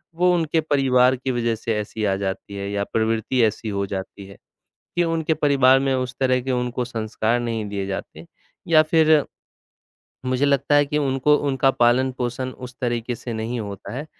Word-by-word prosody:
वो 180 Hz, +1 st, +3 dB
उनके 160 Hz, -1 st, +1 dB
परिवार 130 Hz, -4 st, +3 dB
की 130 Hz, +1 st, -3 dB
वज़ह 120 Hz, -2 st, 0 dB
से 115 Hz, 0 st, -3 dB
ऐसी 110 Hz, +1 st, -5 dB
आ 95 Hz, -1 st, +1 dB
जाती 95 Hz, +1 st, -4 dB
है 100 Hz, 0 st, -4 dB
या 100 Hz, 0 st, -1 dB
प्रवृत्ति 115 Hz, +3 st, +1 dB
ऐसी 110 Hz, 0 st, 0 dB
हो 100 Hz, -1 st, -1 dB
जाती 95 Hz, +1 st, -6 dB
है, 100 Hz, -, -13 dB, 0.6 s
कि 175 Hz, -, +3 dB
उनके 165 Hz, -1 st, 0 dB
परिवार 135 Hz, -3 st, +4 dB
में 135 Hz, 0 st, 0 dB
उस 130 Hz, -1 st, -3 dB
तरह 130 Hz, -1 st, +2 dB
के 130 Hz, +1 st, -3 dB
उनको 125 Hz, 0 st, -1 dB
संस्कार 115 Hz, 0 st, -1 dB
नहीं 115 Hz, -2 st, -3 dB
दिए 100 Hz, -1 st, -3 dB
जाते, 100 Hz, -, -6 dB, 0.4 s
या 155 Hz, -2 st, +6 dB
फिर 155 Hz, -1 st, +4 dB, 1.0 s
मुझे 130 Hz, +2 st, +1 dB
लगता 140 Hz, +1 st, +2 dB
है 145 Hz, 0 st, +5 dB
कि 150 Hz, +1 st, -1 dB
उनको 140 Hz, +1 st, +2 dB
उनका 135 Hz, 0 st, +3 dB
पालन-पोषण 125 Hz, 0 st, 0 dB, 0.2 s
उस 125 Hz, -, -14 dB
तरीके 120 Hz, -1 st, -2 dB
से 120 Hz, -, -6 dB
नहीं 115 Hz, +2 st, -3 dB
होता 100 Hz, -2 st, -7 dB
है। 140 Hz, +4 st, -5 dB
125 Hz, 180 wpm, -22 LUFS, 110-140 Hz, 1.0 s, या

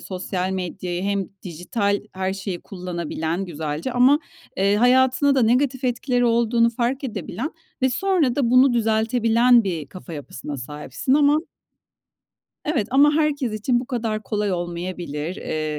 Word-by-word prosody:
sosyal 185 Hz, 0 st, -3 dB
medyayı 180 Hz, -1 st, -4 dB
hem 200 Hz, -1 st, -1 dB
dijital 200 Hz, +4 st, -1 dB
her 190 Hz, 0 st, -2 dB
şeyi 190 Hz, -2 st, -5 dB
kullanabilen 175 Hz, -1 st, -4 dB
güzelce 160 Hz, -, -4 dB
ama, 255 Hz, +4 st, +5 dB, 0.4 s
eee, 200 Hz, +1 st, +2 dB
hayatına 260 Hz, +4 st, +4 dB
da 260 Hz, -, +3 dB
negatif 255 Hz, +3 st, +2 dB
etkileri 245 Hz, 0 st, 0 dB
olduğunu 235 Hz, 0 st, +3 dB
fark 250 Hz, +4 st, -2 dB
edebilen 260 Hz, +3 st, -4 dB, 0.3 s
ve 260 Hz, -, +4 dB
sonra 310 Hz, -3 st, +1 dB
da 250 Hz, -5 st, +1 dB
bunu 255 Hz, +1 st, +6 dB
düzeltebilen 230 Hz, +1 st, +3 dB
bir 165 Hz, -6 st, -3 dB
kafa 180 Hz, 0 st, -10 dB
yapısına 150 Hz, -1 st, -7 dB
sahipsin 150 Hz, -, -2 dB
ama 295 Hz, +1 st, +4 dB, 1.2 s
Evet 275 Hz, -9 st, 0 dB
ama 285 Hz, +3 st, +5 dB
herkes 295 Hz, -6 st, 0 dB
için 240 Hz, +3 st, 0 dB
bu 250 Hz, -, -7 dB
kadar 225 Hz, -4 st, -2 dB
kolay 205 Hz, 0 st, -1 dB
olmayabilir. 175 Hz, -2 st, -4 dB
Eee 155 Hz, -1 st, -3 dB
220 Hz, 135 wpm, -22 LUFS, 180-255 Hz, 1.2 s, bunu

